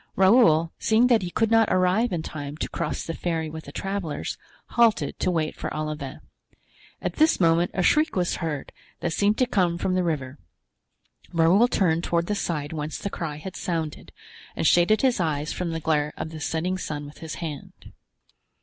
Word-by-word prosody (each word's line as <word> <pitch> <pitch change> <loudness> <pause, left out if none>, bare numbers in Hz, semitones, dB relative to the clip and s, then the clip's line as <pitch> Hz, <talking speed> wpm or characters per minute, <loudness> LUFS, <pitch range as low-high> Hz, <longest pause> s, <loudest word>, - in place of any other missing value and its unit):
Raoul, 185 -5 +5
seeing 225 +2 +3
that 225 - +4
he 180 - -3
could 225 +5 0
not 225 -1 +5
arrive 185 +6 +2
in 170 -3 -2
time 145 -1 -6
to - - -2
cross 170 -3 -3
the 165 - -4
ferry 160 -2 -2
with 160 0 -8
the 140 - -9
travelers, 195 -2 -3 0.3
halted 225 -12 +2
to - - +1
wait 160 -3 -1
for - - -5
Olivain. 150 -3 -5 0.8
At - - -3
this 315 +1 +4
moment 170 0 +3
a 185 - +1
shriek 310 - +3
was 180 -2 0
heard 155 -5 -4 0.3
that 170 - -1
seemed 205 +3 +2
to 255 - +3
come 180 -8 +1
from 185 - -1
the 185 0 +1
river. 145 -5 -3 0.9
Raoul 170 +8 +4
turned 170 -7 +1
toward 170 0 0
the 210 - -1
side 160 -7 -2
whence 155 0 -4
the 200 - -4
cry 155 -3 -4
had 170 +5 -8
sounded, 160 -3 -4 0.4
and - - -2
shaded 175 +9 +4
his 255 -5 +3
eyes 155 -3 -1
from 180 -2 -3
the 165 0 -3
glare 150 -1 0
of 160 - -5
the 160 - -7
setting 175 +5 -2
sun 145 -4 -4
with 145 - -12
his 160 -1 -6
hand. 155 -4 -8
170 Hz, 190 wpm, -25 LUFS, 155-190 Hz, 0.9 s, Raoul